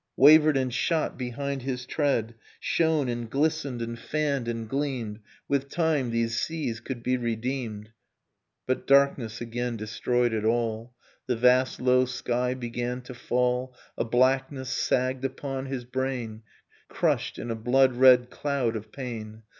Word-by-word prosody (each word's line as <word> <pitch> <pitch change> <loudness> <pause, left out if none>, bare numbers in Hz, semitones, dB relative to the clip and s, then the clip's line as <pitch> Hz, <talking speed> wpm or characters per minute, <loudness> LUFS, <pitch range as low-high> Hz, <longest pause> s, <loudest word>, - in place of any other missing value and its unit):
Wavered 155 +1 +7
and 130 -2 -1
shot 155 +5 0
behind 135 +2 -4
his 125 -1 -4
tread. 130 -6 0 0.3
Shone 160 -4 +1
and 120 -1 -3
glistened 140 -3 0
and 115 0 -5
fanned 140 -3 -1
and 115 -1 -3
gleamed: 130 -5 -3 0.3
With 140 0 0
time, 155 -6 +1
these 115 0 0
seas 145 -9 -3
could 120 0 -6
be 125 0 +1
redeemed... 120 -2 -3
Innocence - - -41 0.7
But 130 - -2
darkness 135 -5 +3
again 120 0 -3
destroyed 120 +2 0
it 110 -1 -1
all, 115 +1 -1 0.3
The 125 - +1
vast 125 +2 +3
low 125 0 +4
sky 125 0 -1
began 125 0 -4
to 125 - -9
fall, 125 +1 -1 0.2
A - - 0
blackness 130 +2 +1
sagged 130 0 0
upon 135 0 -4
his 130 -2 -4
brain, 125 -3 -3 0.5
Crushed, - - 0
in 120 - -4
a - - -1
blood 130 +4 +3
red 125 -1 +6
cloud 135 -6 -1
of 110 0 -7
pain. 110 -4 -7
125 Hz, 145 wpm, -27 LUFS, 115-135 Hz, 0.7 s, Wavered